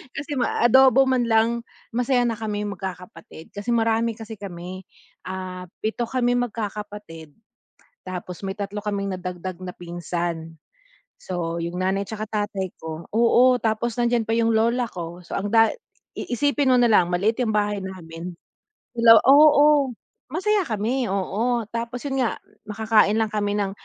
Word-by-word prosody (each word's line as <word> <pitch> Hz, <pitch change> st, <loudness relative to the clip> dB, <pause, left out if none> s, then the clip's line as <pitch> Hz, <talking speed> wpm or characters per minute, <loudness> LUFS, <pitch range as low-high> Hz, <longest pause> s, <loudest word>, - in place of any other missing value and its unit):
Kasi 290 Hz, +2 st, -6 dB
ma 245 Hz, -, 0 dB
adobo 265 Hz, +2 st, +6 dB
man 255 Hz, -3 st, +1 dB
lang 230 Hz, +1 st, +2 dB, 0.3 s
masaya 245 Hz, +1 st, +1 dB
na 230 Hz, -2 st, -1 dB
kaming 210 Hz, -1 st, -3 dB
magkakapatid 180 Hz, -4 st, -9 dB
kasi 205 Hz, +3 st, -8 dB
marami 225 Hz, 0 st, +1 dB
kasi 220 Hz, -1 st, -9 dB
kami, 185 Hz, -1 st, -8 dB, 0.4 s
ah, 185 Hz, -1 st, -6 dB, 0.2 s
7 220 Hz, +2 st, -1 dB
kaming 245 Hz, 0 st, +1 dB
magkakapatid, 205 Hz, -7 st, -7 dB, 0.7 s
tapos 180 Hz, -1 st, -6 dB
may 195 Hz, -, -3 dB
3 205 Hz, +1 st, -4 dB
kaming 200 Hz, -2 st, -2 dB
nadagdag 180 Hz, 0 st, -6 dB
na 185 Hz, -, -6 dB
pinsan. 170 Hz, -1 st, -4 dB, 0.6 s
So 170 Hz, -2 st, -4 dB
yung 170 Hz, +2 st, -3 dB
nanay 195 Hz, +2 st, 0 dB
'tsaka 215 Hz, +1 st, -6 dB
tatay 205 Hz, -3 st, -3 dB
ko, 160 Hz, +1 st, -7 dB
oo 240 Hz, +3 st, +4 dB
tapos 225 Hz, +1 st, -1 dB
nandiyan 240 Hz, -1 st, +2 dB
pa 225 Hz, +1 st, +1 dB
yung 230 Hz, 0 st, +2 dB
lola 235 Hz, +3 st, +2 dB
ko. 175 Hz, 0 st, -7 dB
So -, -, -9 dB
ang 205 Hz, +1 st, -2 dB
da 225 Hz, +1 st, +5 dB, 0.4 s
iisipin 285 Hz, +3 st, 0 dB
mo 255 Hz, -, +5 dB
nalang 215 Hz, -8 st, +4 dB
maliit 210 Hz, +7 st, +1 dB
yung 220 Hz, -3 st, 0 dB
bahay 205 Hz, -1 st, 0 dB
namin. 175 Hz, -2 st, -8 dB, 0.6 s
Ilaw 230 Hz, -1 st, +8 dB
Oo, 290 Hz, -2 st, +6 dB, 0.4 s
masaya 390 Hz, +2 st, +1 dB
kami, 235 Hz, +4 st, -1 dB
oo, 220 Hz, +5 st, 0 dB
tapos 235 Hz, +1 st, -4 dB
'yun 270 Hz, -1 st, 0 dB
nga -, -, -3 dB, 0.3 s
makakain 215 Hz, 0 st, +3 dB
lang 220 Hz, -1 st, +1 dB
kami 205 Hz, -1 st, -1 dB
ng 200 Hz, -1 st, 0 dB
215 Hz, 150 wpm, -23 LUFS, 185-235 Hz, 0.7 s, Ilaw